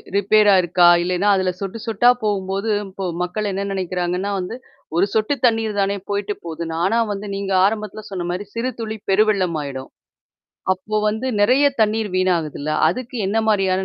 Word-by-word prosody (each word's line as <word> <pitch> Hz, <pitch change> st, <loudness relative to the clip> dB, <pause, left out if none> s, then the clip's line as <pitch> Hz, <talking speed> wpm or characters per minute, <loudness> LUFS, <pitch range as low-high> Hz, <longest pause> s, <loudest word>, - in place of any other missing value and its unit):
Repair 205 Hz, +1 st, +4 dB
ஆருக்கா? 180 Hz, -1 st, +4 dB, 0.2 s
இல்லைன்னா, 180 Hz, +3 st, 0 dB
அதுல 185 Hz, -1 st, +1 dB
சொட்டு 195 Hz, +3 st, -4 dB
சொட்டா 225 Hz, +2 st, +4 dB
போம்போது 195 Hz, 0 st, -1 dB, 0.2 s
இப்போ 190 Hz, 0 st, -6 dB, 0.2 s
மக்கள் 205 Hz, +4 st, -2 dB
என்ன 195 Hz, +1 st, -3 dB
நெனைக்கிறாங்கன்னா, 180 Hz, +1 st, -2 dB
வந்து 180 Hz, +5 st, -5 dB, 0.4 s
1 185 Hz, -, +4 dB
சொட்டு 220 Hz, +5 st, +1 dB
தண்ணீர் 225 Hz, -3 st, +1 dB
தானே 200 Hz, +1 st, 0 dB
போயிடு 205 Hz, 0 st, -2 dB
போது. 165 Hz, 0 st, -6 dB
நானா 185 Hz, +8 st, +1 dB
வந்து 205 Hz, +1 st, -6 dB
நீங்க 195 Hz, 0 st, -3 dB
ஆரம்பத்தில 215 Hz, 0 st, -2 dB
சொன்ன 185 Hz, -3 st, -4 dB
மாரி 185 Hz, +3 st, -4 dB
"சிறுதுளி 230 Hz, -2 st, -4 dB
பெருவெள்ளமாயிடும்." 180 Hz, -10 st, 0 dB, 0.9 s
அப்போ 205 Hz, +4 st, -5 dB
வந்து 220 Hz, +4 st, -2 dB
நெறைய 255 Hz, +7 st, +4 dB
தண்ணீர் 215 Hz, -1 st, +1 dB
வீணாகுதுல்ல? 165 Hz, -5 st, 0 dB, 0.2 s
அதுக்கு 250 Hz, +6 st, -6 dB
என்ன 215 Hz, +3 st, +1 dB
மாரியான 190 Hz, -2 st, +2 dB
200 Hz, 145 wpm, -20 LUFS, 185-215 Hz, 0.9 s, Repair